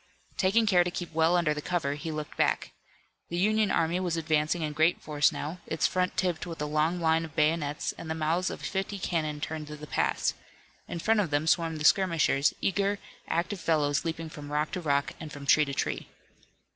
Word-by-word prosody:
Taking 210 Hz, +4 st, +3 dB
care 180 Hz, -4 st, +5 dB
to 175 Hz, -, -2 dB
keep 175 Hz, -1 st, -6 dB
well 165 Hz, +2 st, +3 dB
under 165 Hz, -3 st, +2 dB
cover 165 Hz, -4 st, -1 dB
he 150 Hz, +3 st, -5 dB
looked 150 Hz, -1 st, -5 dB
back. -, -, +1 dB, 0.6 s
The 170 Hz, -, -3 dB
Union 215 Hz, +2 st, +3 dB
army 165 Hz, +2 st, +1 dB
was 175 Hz, -3 st, -1 dB
advancing 155 Hz, +1 st, +1 dB
in 150 Hz, -1 st, -2 dB
great 160 Hz, +4 st, +3 dB
force 150 Hz, -1 st, +2 dB
now, 160 Hz, +5 st, -5 dB
its -, -, 0 dB
front 180 Hz, 0 st, 0 dB
tipped 175 Hz, -3 st, 0 dB
with 165 Hz, -2 st, -7 dB
a 150 Hz, -, -1 dB
long 155 Hz, +4 st, +1 dB
line 160 Hz, 0 st, +2 dB
of 160 Hz, -2 st, -9 dB
bayonets 150 Hz, -1 st, +1 dB
and 165 Hz, -, -7 dB
the 160 Hz, -, -1 dB
mouths 165 Hz, +4 st, 0 dB
of -, -, -7 dB
fifty 195 Hz, +1 st, -2 dB
cannon 155 Hz, -5 st, -2 dB
turned 155 Hz, -1 st, -4 dB
to 150 Hz, -, -7 dB
the 150 Hz, 0 st, -9 dB
pass. -, -, 0 dB, 0.5 s
In -, -, -5 dB
front 220 Hz, +6 st, +2 dB
of 190 Hz, -5 st, +1 dB
them 145 Hz, +1 st, +1 dB
swarmed 165 Hz, -1 st, +1 dB
the 150 Hz, -, -2 dB
skirmishers, 165 Hz, -7 st, +4 dB
eager, 200 Hz, +1 st, +1 dB, 0.3 s
active 180 Hz, +4 st, -1 dB
fellows 150 Hz, -4 st, +1 dB
leaping 165 Hz, -1 st, -4 dB
from 145 Hz, -1 st, -9 dB
rock 150 Hz, +1 st, 0 dB
to 180 Hz, -, -3 dB
rock 140 Hz, -3 st, 0 dB
and 155 Hz, -2 st, -7 dB
from 140 Hz, -1 st, -8 dB
tree 150 Hz, +2 st, +5 dB
to 140 Hz, -, -5 dB
tree. -, -, -2 dB
160 Hz, 210 wpm, -28 LUFS, 150-180 Hz, 0.6 s, care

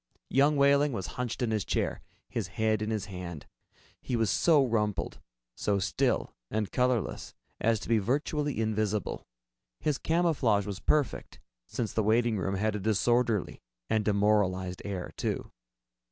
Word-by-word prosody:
Young 145 Hz, +2 st, +4 dB
Wehling 140 Hz, 0 st, +4 dB
was 95 Hz, -5 st, -3 dB, 0.2 s
hunched 125 Hz, 0 st, -2 dB
in 115 Hz, -, 0 dB
his 105 Hz, -3 st, 0 dB
chair, -, -, -1 dB, 0.3 s
his -, -, -3 dB
head 110 Hz, -1 st, 0 dB
in 110 Hz, -, -1 dB
his 110 Hz, -3 st, -1 dB
hand. 90 Hz, -5 st, -7 dB, 0.6 s
He 125 Hz, -, -2 dB
was 115 Hz, -3 st, +2 dB
so 150 Hz, -5 st, +4 dB
rumpled, 105 Hz, -4 st, -1 dB, 0.3 s
so 100 Hz, +8 st, 0 dB
still 95 Hz, -2 st, 0 dB, 0.2 s
and 110 Hz, -1 st, -2 dB
colorless 125 Hz, -4 st, 0 dB, 0.2 s
as 115 Hz, -1 st, +2 dB
to -, -, -7 dB
be 115 Hz, -1 st, +3 dB
virtually 145 Hz, +5 st, -1 dB
invisible. 110 Hz, -2 st, -1 dB, 0.5 s
His 150 Hz, -4 st, 0 dB
camouflage 150 Hz, -, +2 dB
was 100 Hz, -2 st, -5 dB
perfect, 150 Hz, +2 st, 0 dB, 0.3 s
since 115 Hz, -3 st, -3 dB
the 110 Hz, -, +2 dB
waiting 110 Hz, 0 st, +2 dB
room 95 Hz, +1 st, -1 dB
had 105 Hz, +2 st, 0 dB
a -, -, -2 dB
disorderly 110 Hz, +1 st, +1 dB, 0.3 s
and 110 Hz, -1 st, +2 dB
demoralized 100 Hz, -3 st, +1 dB
air, 95 Hz, -3 st, -4 dB
too. -, -, -2 dB
110 Hz, 150 wpm, -29 LUFS, 100-125 Hz, 0.6 s, Young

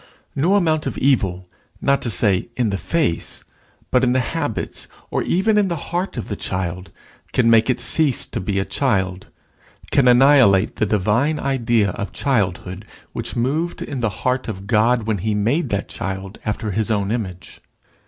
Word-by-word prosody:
No 170 Hz, +8 st, +2 dB
amount 160 Hz, -6 st, +1 dB
of -, -, -4 dB
evil, 95 Hz, -9 st, +1 dB, 0.3 s
not 140 Hz, 0 st, +2 dB
to 120 Hz, -, 0 dB
say 100 Hz, 0 st, +2 dB
in 120 Hz, -4 st, 0 dB
the 100 Hz, -, -1 dB
face, 150 Hz, -, -1 dB, 0.5 s
but 125 Hz, 0 st, +3 dB
in 125 Hz, -1 st, +3 dB
the 130 Hz, -, +2 dB
habits, 140 Hz, -9 st, -3 dB, 0.2 s
or -, -, 0 dB
even 210 Hz, +4 st, +2 dB
in 205 Hz, -, +2 dB
the 170 Hz, -, -1 dB
heart 175 Hz, +2 st, -4 dB
of 120 Hz, -, -4 dB
the 105 Hz, -, -3 dB
child, 90 Hz, -1 st, -4 dB, 0.4 s
can 115 Hz, -2 st, +3 dB
make 115 Hz, +1 st, +4 dB
it 125 Hz, -, +1 dB
cease 150 Hz, -6 st, +2 dB
to -, -, -5 dB
be 100 Hz, +2 st, -2 dB
a 95 Hz, -, 0 dB
child, 95 Hz, -9 st, -1 dB, 0.6 s
can 135 Hz, -3 st, +4 dB
annihilate 125 Hz, -6 st, +5 dB
the 110 Hz, -, +1 dB
divine 110 Hz, +10 st, +1 dB
idea 120 Hz, -6 st, +1 dB
of 100 Hz, -, -6 dB
childhood 95 Hz, -7 st, -1 dB, 0.3 s
which -, -, -3 dB
moved 150 Hz, +8 st, -1 dB
in 140 Hz, -3 st, -5 dB
the 115 Hz, -2 st, 0 dB, 0.2 s
heart 125 Hz, +1 st, 0 dB
of 100 Hz, -3 st, -6 dB
God 115 Hz, +2 st, +2 dB
when 110 Hz, -2 st, -1 dB
he 105 Hz, +3 st, -1 dB
made 120 Hz, +12 st, 0 dB
that 100 Hz, 0 st, -2 dB
child 95 Hz, +1 st, -6 dB
after 105 Hz, 0 st, -3 dB
his 110 Hz, +2 st, -1 dB
own 100 Hz, -2 st, 0 dB
image. 95 Hz, -6 st, -5 dB
115 Hz, 175 wpm, -20 LUFS, 100-135 Hz, 0.6 s, annihilate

